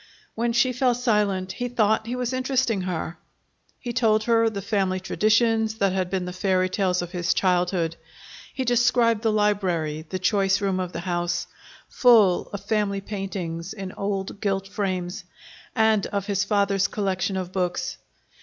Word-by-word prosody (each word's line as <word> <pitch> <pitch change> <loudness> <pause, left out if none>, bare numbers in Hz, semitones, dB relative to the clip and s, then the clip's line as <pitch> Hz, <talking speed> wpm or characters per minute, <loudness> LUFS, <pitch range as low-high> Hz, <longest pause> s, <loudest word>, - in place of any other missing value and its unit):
When 235 +1 0
she 240 +2 +2
fell 250 0 +2
silent, 210 -6 0
he 245 +6 -3
thought 220 -2 +1
he 245 - -2
was 250 0 -2
interesting 255 -5 0
her. 175 -2 -4 0.6
He 240 - -5
told 220 -3 +2
her 230 0 +3
the 205 -2 -5
family 190 -2 0
traditions 220 +3 +2
that 195 -4 +1
had 185 -2 -1
been 185 -1 -2
the 180 - -5
fairy 185 0 +1
tales 185 -2 0
of 175 - -8
his 175 -2 0
childhood. 180 -2 +1 0.5
He 260 - -3
described 240 -2 +3
the 225 -1 +2
library, 180 -7 0
the 185 - -2
choice 195 0 +2
room 195 -2 0
of 180 -1 -3
the 170 - -5
house, 175 -1 -1 0.4
full 220 -8 +4
of 200 -1 -7
family 205 -2 0
paintings 190 -4 -5
in 195 -3 -6
old 200 0 -4
gilt 195 -2 -1
frames, 190 -1 -3 0.5
and 220 -3 +3
of 200 -2 -3
his 200 -1 0
father's 200 -1 +2
collection 195 -1 -1
of 185 -1 -4
books. 180 -2 -2
200 Hz, 165 wpm, -24 LUFS, 185-220 Hz, 0.6 s, full